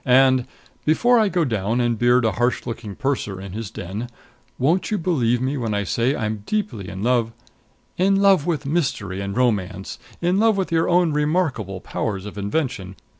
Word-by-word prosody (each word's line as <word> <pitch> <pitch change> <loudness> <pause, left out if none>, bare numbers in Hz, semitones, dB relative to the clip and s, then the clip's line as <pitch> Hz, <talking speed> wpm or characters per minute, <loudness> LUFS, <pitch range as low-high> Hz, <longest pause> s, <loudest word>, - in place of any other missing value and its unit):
And, 130 0 +4 0.4
before 240 +10 +4
I 215 -2 +3
go 175 -4 +1
down 110 -1 -1
and 120 -1 +1
beard 120 +2 +3
a 110 - +3
harsh 120 +3 0
looking 115 -3 -6
purser 125 -8 -2
in 95 0 -8
his 110 -1 -5
den, 105 +4 -6 0.5
won't 165 +8 +1
you 215 - 0
believe 130 - +1
me 130 +3 -1
when 115 -4 -2
I 100 - 0
say 120 +8 0
I'm 110 -4 -3
deeply 205 - -2
in 95 +2 -6
love 120 -2 +2 0.3
" - - -39
"In 195 +2 +4
love 195 -5 +4
with 150 -5 -1
mystery 130 - -1
and 100 +2 -4
romance! 100 -6 -1 0.2
In 180 +3 +1
love 220 -1 +3
with 190 -3 -1
your 165 0 +2
own 175 -3 +3
remarkable 150 - 0
powers 100 -3 -3
of 105 - -8
invention! 100 - -2
125 Hz, 185 wpm, -22 LUFS, 105-165 Hz, 0.5 s, And